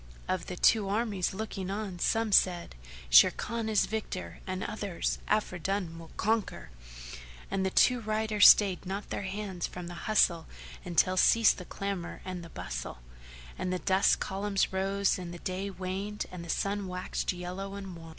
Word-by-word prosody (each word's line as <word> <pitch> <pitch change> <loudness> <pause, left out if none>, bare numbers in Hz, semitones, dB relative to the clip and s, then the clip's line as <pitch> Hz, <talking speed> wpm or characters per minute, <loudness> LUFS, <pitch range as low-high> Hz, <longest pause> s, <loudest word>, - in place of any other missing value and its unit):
Of 185 -2 -2
the 180 - -5
two 205 +2 +3
armies 205 -3 0
looking 195 -2 -5
on, 200 -3 -4
some 225 +4 +1
said, 180 -3 +3 0.4
"Sharrkan 220 - +4
is 215 -2 +3
victor!" 215 -4 -5
and 185 0 -3
others, 205 -5 -3
"Afridun 185 -4 -1
will 165 -1 -11
conquer!"; 215 - -1 0.8
and 190 - 0
the 190 - +1
two 250 +6 +4
riders 215 -1 +4
stayed 190 -3 +4
not 195 +2 -5
their - - -2
hands 195 -2 -4
from 180 -1 -8
the 175 - -7 0.2
hustle 170 -6 +3 0.4
until 180 +1 +2
ceased 230 +2 +5
the 180 - -8
clamour 195 -3 -5
and 185 -2 -5
the 170 - -10
bustle; - - -6 0.6
and 185 - -2
the 185 - 0
dust 190 +2 +3
columns 195 0 -1
rose 195 0 +1
and 175 -1 -6
the 175 - -7
day 185 +3 -4
waned 190 +3 -4
and 180 -2 -7
the 170 - -10
sun 200 +3 -1
waxed 180 0 -3
yellow 185 +2 -6
and 195 -3 -7
wan. 165 -1 -11
190 Hz, 165 wpm, -30 LUFS, 180-205 Hz, 0.8 s, ceased